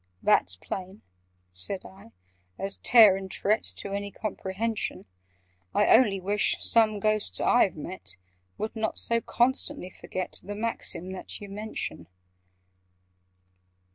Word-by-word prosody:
"That's 90 - +4
plain," 190 - -7 0.5
said 185 - -3
I, 190 -11 -14 0.5
"as 195 0 -3
Tare 220 -6 +7
and 190 0 -7
Tret, 210 +3 +1 0.2
To 200 - -6
any 200 0 -3
comprehension: 215 +2 -3 0.7
I - - +6
only 205 -6 +4
wish 200 +2 +1
some 220 -2 +3
Ghosts 215 0 0
I've 245 -6 +4
met 150 - -5 0.4
Would 220 - -4
not 220 -1 -2
so 230 0 0
constantly 250 -5 0
forget 185 +1 -4
The 205 +1 -6
maxim 210 -4 -2
that 190 - -6
you 205 - -9
mention!" 210 +2 -5
200 Hz, 120 wpm, -27 LUFS, 190-220 Hz, 0.7 s, Tare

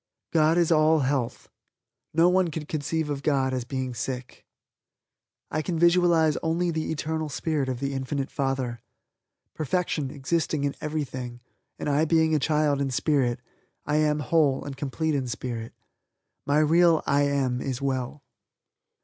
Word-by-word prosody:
God 160 0 +4
is 170 -1 +3
all 155 0 +4
health. 130 -3 -1 0.6
No 165 +2 +4
one 185 0 +3
could 155 -1 -6
conceive 155 0 -2
of 140 -1 -3
God 135 -3 +1
as 125 -2 -2
being 130 0 -3
sick. 125 +1 -6 1.0
I 155 - 0
can 170 +1 -2
visualize 170 -2 +4
only 170 +2 0
the 160 -1 -2
eternal 160 0 -2
spirit 145 -1 -1
of 125 -2 -3
the 140 +1 -2
Infinite 135 +1 -3
Father. 135 -4 -2 0.7
Perfection 155 -2 -1
existing 150 +2 -1
in 140 -1 0
everything 130 -5 -4 0.4
and - - -5
I 145 +2 +2
being 160 0 +3
a 155 - +3
child 150 0 +1
in 140 - 0
Spirit, 130 -2 +1 0.4
am 150 0 +2
well, 150 - -5
whole 150 -5 +3
and 140 -1 -6
complete 150 +3 -2
in 135 -3 -1
Spirit. 115 -1 -5 0.8
My 145 +1 +3
real 165 +2 +4
"I 140 +1 +2
am" 130 -3 0
is 130 -3 -3
well. 135 +1 -3
145 Hz, 150 wpm, -26 LUFS, 135-160 Hz, 1.0 s, God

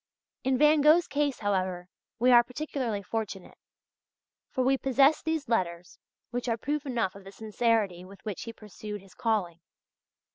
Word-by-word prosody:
In 265 0 +2
Van 300 +2 +5
Gogh's 315 +4 +6
case, 285 -2 -1
however, 185 -3 -1 0.3
we 250 +2 +4
are 240 -1 +8
particularly 250 -5 -3
fortunate; 205 -3 -5 0.9
for 255 - -1
we 265 +2 +3
possess 270 +3 +3
these 320 -2 -2
letters 180 -6 -2 0.3
which 245 0 -3
are 230 - +1
proof 290 +4 -3
enough 230 -7 -1
of 200 - -13
the 195 - -11
sincerity 215 -3 0
with 195 +3 -14
which 205 -5 -4
he 230 - -5
pursued 210 -1 -8
his 195 -1 -18
calling. 200 -7 -1
230 Hz, 155 wpm, -28 LUFS, 195-265 Hz, 0.9 s, are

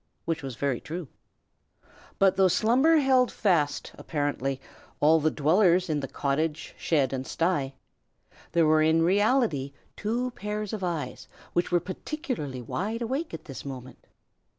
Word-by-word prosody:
Which 165 -1 -1
was 135 -3 -6
very 135 -1 -1
true. 165 -2 -6 1.1
But 195 -1 +4
though 190 0 +5
slumber 245 - +4
held 260 -3 +4
fast, 170 -8 +1
apparently, 140 -3 -2 0.4
all 160 +2 +5
the 155 +1 +2
dwellers 175 +3 +3
in 150 -1 0
cottage, 145 +3 -2
shed, 140 -5 +1
and 130 0 -3
sty, 155 -6 0 0.8
there 170 -1 +4
were 155 0 +4
in 160 +1 +4
reality 195 - +2 0.2
two 240 +4 -2
pairs 210 -1 -4
of 210 -3 -4
eyes 160 -8 -3 0.3
which 175 +1 0
were 175 - +4
particularly 185 - -5
wide 215 - -3
awake 270 +8 -2
at - - -8
this 135 - -8
moment. 130 -2 -9
165 Hz, 140 wpm, -27 LUFS, 145-210 Hz, 1.1 s, though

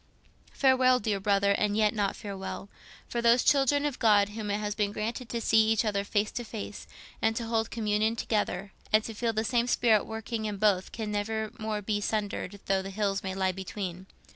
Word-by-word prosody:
"Farewell, 260 -2 +4
dear 205 -3 -1
brother—and 200 +1 +2
yet 215 -1 +3
not 205 -3 0
farewell. 195 -1 -6 0.4
For 235 - -2
those 235 +1 +5
children 285 +1 +3
of 290 -4 -2
God 205 -3 +4
whom 210 0 -5
it 205 - +1
has 210 -1 -2
been 205 -1 0
granted 225 +4 -4
to 235 - -2
see 220 -1 +3
each 225 0 +2
other 200 -2 0
face 205 +1 0
to 240 - -4
face, 215 -2 -7 0.3
and 225 0 +2
to 230 - -3
hold 225 -1 0
communion 215 0 0
together, 205 -3 -2 0.2
and 215 0 +4
to 225 - -6
feel 230 +2 -1
the 220 0 -1
same 240 +1 +1
spirit 225 -3 +3
working 225 0 -4
in 210 -1 -3
both 195 -2 +2
can 220 -2 -4
never 220 +1 -2
more 215 -1 -3
be 205 0 -1
sundered 205 -2 -2
though 195 -1 +1
the 195 - -6
hills 195 -1 -1
may 190 0 -4
lie 190 -1 +1
between. 190 -1 -6
215 Hz, 200 wpm, -29 LUFS, 200-225 Hz, 0.4 s, those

